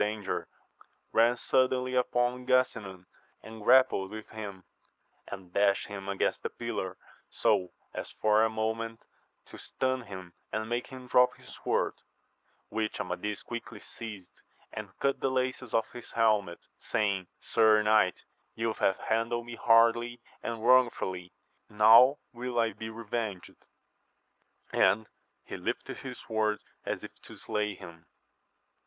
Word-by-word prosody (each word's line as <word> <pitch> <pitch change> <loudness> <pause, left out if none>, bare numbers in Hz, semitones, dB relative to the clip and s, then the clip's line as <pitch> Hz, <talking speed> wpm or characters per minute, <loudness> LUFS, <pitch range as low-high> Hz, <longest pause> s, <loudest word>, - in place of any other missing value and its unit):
159 105 +1 +1
danger, 90 -2 -3 0.7
ran 115 +2 +4
suddenly 130 0 +1
upon 125 0 +1
Gasinan 110 -8 +1 0.4
and 110 0 -10
grappled 125 -4 +5
with 110 +1 -8
him, 100 -4 -7 0.6
and 95 -2 -9
dashed 100 -1 +3
him 100 -1 -6
against 100 - 0
the - - -3
pillar, - - -4 0.3
so 95 -4 +2 0.2
as - - -5
for 110 0 +3
a 110 - +3
moment 110 +1 -3 0.4
to - - -12
stun 130 -1 -1
him 95 -3 -9 0.2
and 110 0 -2
make 120 +1 -2
him 130 -1 -10
drop 125 0 +4
his - - -13
sword, - - +1 0.8
which 110 0 -2
Amadis 105 0 -3
quickly 120 0 -7
seized, 105 -6 -10 0.3
and - - -6
cut 140 0 +1
the 135 - +1
laces 130 -1 -1
of 115 -1 +2
his 120 -1 -10
helmet, 105 -6 +2 0.2
saying, 100 -4 -1
Sir 110 -2 +4
knight, 105 -4 +3 0.3
you 115 0 -1
have 95 - +1
handled 115 +1 0
me 120 - -8
hardly 115 +1 +4 0.2
and 115 -1 -4
wrongfully, 105 -8 +3 0.4
now 115 +6 +7 0.2
will 120 0 -4
I 115 -2 +2
be 110 +2 -7
revenged! 110 -3 -4 1.2
and 100 +4 +4 0.4
he - - -7
lifted - - -4
his - - -7
sword 110 -1 +1 0.3
as - - -2
if - - -8
to - - -13
slay 105 -1 -2
him. 85 -4 -12
110 Hz, 135 wpm, -30 LUFS, 100-120 Hz, 1.2 s, now